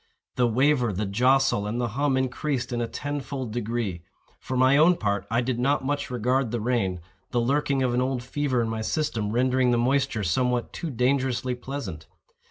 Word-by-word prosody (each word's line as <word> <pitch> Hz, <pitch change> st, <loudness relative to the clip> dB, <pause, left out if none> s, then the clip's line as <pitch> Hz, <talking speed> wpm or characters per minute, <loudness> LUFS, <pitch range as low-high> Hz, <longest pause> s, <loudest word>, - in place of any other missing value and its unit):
The 125 Hz, -1 st, +3 dB
waver, 125 Hz, 0 st, +2 dB
the 105 Hz, +2 st, -2 dB
jostle, 125 Hz, +1 st, +2 dB
and 115 Hz, +3 st, -2 dB
the 120 Hz, -1 st, 0 dB
hum 135 Hz, +3 st, 0 dB
increased 130 Hz, -1 st, -2 dB
in 120 Hz, -, -1 dB
a 115 Hz, -, -1 dB
tenfold 140 Hz, -4 st, -4 dB
degree. 115 Hz, -6 st, -2 dB, 0.4 s
For 130 Hz, -, -4 dB
my 130 Hz, +2 st, +5 dB
own 160 Hz, +5 st, +6 dB
part 100 Hz, -, -1 dB
I 115 Hz, +2 st, +2 dB
did 125 Hz, -1 st, -2 dB
not 135 Hz, +2 st, +1 dB
much 145 Hz, 0 st, -1 dB
regard 125 Hz, +1 st, 0 dB
the 120 Hz, +1 st, -2 dB
rain—the 95 Hz, -2 st, -2 dB
lurking 135 Hz, +2 st, +1 dB
of 125 Hz, -2 st, +1 dB
an 125 Hz, -, +2 dB
old 130 Hz, -1 st, -1 dB
fever 130 Hz, -2 st, 0 dB
in -, -, -2 dB
my 110 Hz, 0 st, -3 dB
system 115 Hz, -4 st, -1 dB
rendering 125 Hz, +2 st, +2 dB
the 120 Hz, -, +3 dB
moisture 130 Hz, -2 st, +1 dB
somewhat 125 Hz, +7 st, 0 dB
too 170 Hz, -, -4 dB
dangerously 130 Hz, -1 st, 0 dB
pleasant. 120 Hz, -, -6 dB
125 Hz, 180 wpm, -26 LUFS, 115-135 Hz, 0.4 s, own